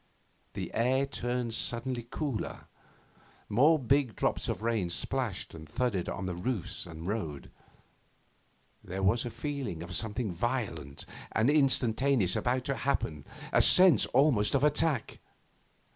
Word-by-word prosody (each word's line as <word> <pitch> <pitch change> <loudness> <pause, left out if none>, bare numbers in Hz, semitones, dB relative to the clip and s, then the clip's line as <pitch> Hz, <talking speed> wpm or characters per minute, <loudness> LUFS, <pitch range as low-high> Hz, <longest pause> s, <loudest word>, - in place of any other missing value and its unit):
The - - -5
air 130 +4 +2
turned 125 -3 -3
suddenly 120 +2 -1
cooler. 140 -7 -4 0.9
More 145 +9 +4
big 135 -4 +1
drops - - -1
of - - -3
rain 115 -6 0
splashed 115 +2 -2
and 80 -2 -11
thudded 105 -3 -1
on 95 - -4
the 90 - -3
roofs 90 0 -4
and 80 -1 -9
road. 80 -10 -4 1.3
There 95 +2 -5
was 110 +6 +2
a - - -3
feeling 120 - -5
of 85 +1 -8
something 110 -1 -2
violent 85 - -3 0.3
and 110 +6 +3
instantaneous 130 - +3
about 125 0 0
to 140 - -2
happen, 80 - -2 0.3
a - - +5
sense 180 - +7
almost 130 -5 +3
of 140 - +2
attack. 150 -3 0
120 Hz, 130 wpm, -30 LUFS, 95-135 Hz, 1.3 s, sense